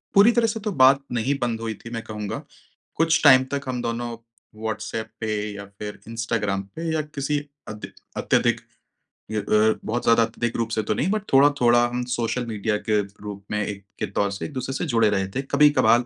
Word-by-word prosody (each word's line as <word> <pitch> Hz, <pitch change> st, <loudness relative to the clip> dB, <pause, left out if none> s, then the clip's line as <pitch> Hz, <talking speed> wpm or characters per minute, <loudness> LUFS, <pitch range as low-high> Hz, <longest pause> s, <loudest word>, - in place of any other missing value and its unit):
पूरी 205 Hz, +4 st, +8 dB
तरह 235 Hz, -1 st, +3 dB
से 225 Hz, 0 st, -2 dB
तो 210 Hz, -, 0 dB
बात 135 Hz, +1 st, +7 dB
नहीं 125 Hz, +3 st, 0 dB
बंद 115 Hz, -2 st, -1 dB
हुई 115 Hz, -1 st, -2 dB
थी, 115 Hz, -, -11 dB
मैं 115 Hz, -1 st, -3 dB
कहूँगा 105 Hz, -1 st, -5 dB, 0.5 s
कुछ 165 Hz, 0 st, +2 dB
टाइम 130 Hz, -3 st, +8 dB
तक 140 Hz, -, 0 dB
हम 125 Hz, -2 st, -2 dB
दोनों 120 Hz, 0 st, -2 dB, 0.5 s
व्हाट्सऐप 110 Hz, 0 st, -3 dB
पे 110 Hz, -1 st, -2 dB, 0.2 s
या 100 Hz, 0 st, -7 dB
फिर 105 Hz, 0 st, -6 dB
इंस्टाग्राम 115 Hz, -4 st, -1 dB
पे 165 Hz, -, -5 dB
या 155 Hz, -, +1 dB
किसी 150 Hz, -1 st, -2 dB, 0.3 s
अधि 105 Hz, -1 st, -7 dB, 0.3 s
अत्यधिक -, -, +2 dB, 0.7 s
य 110 Hz, -, 0 dB
अ, 105 Hz, +2 st, +3 dB
बहुत 120 Hz, +3 st, -1 dB
ज़्यादा 115 Hz, 0 st, +5 dB
अत्यधिक 115 Hz, +1 st, -2 dB
रूप 115 Hz, -1 st, -1 dB
से 110 Hz, -1 st, -1 dB
तो 110 Hz, -, 0 dB
नहीं, 150 Hz, -, 0 dB
बट 215 Hz, -1 st, 0 dB
थोड़ा-थोड़ा 130 Hz, -4 st, +5 dB
हम 125 Hz, +1 st, -3 dB
सोशल 120 Hz, +1 st, -1 dB
मीडिया 105 Hz, -1 st, -1 dB
के 105 Hz, -1 st, +4 dB, 0.2 s
रूप 100 Hz, -1 st, -7 dB
में 105 Hz, 0 st, 0 dB
एक 100 Hz, -1 st, -6 dB, 0.2 s
के -, -, 0 dB
तौर 100 Hz, 0 st, 0 dB
से 100 Hz, -, -5 dB
एक-दूसरे 130 Hz, -2 st, -4 dB
से 175 Hz, -, -1 dB
जुड़े 115 Hz, -7 st, +3 dB
रहे 95 Hz, -2 st, 0 dB
थे। 135 Hz, -, +1 dB
कभी-कभार 125 Hz, -5 st, +5 dB
115 Hz, 200 wpm, -24 LUFS, 110-135 Hz, 0.7 s, पूरी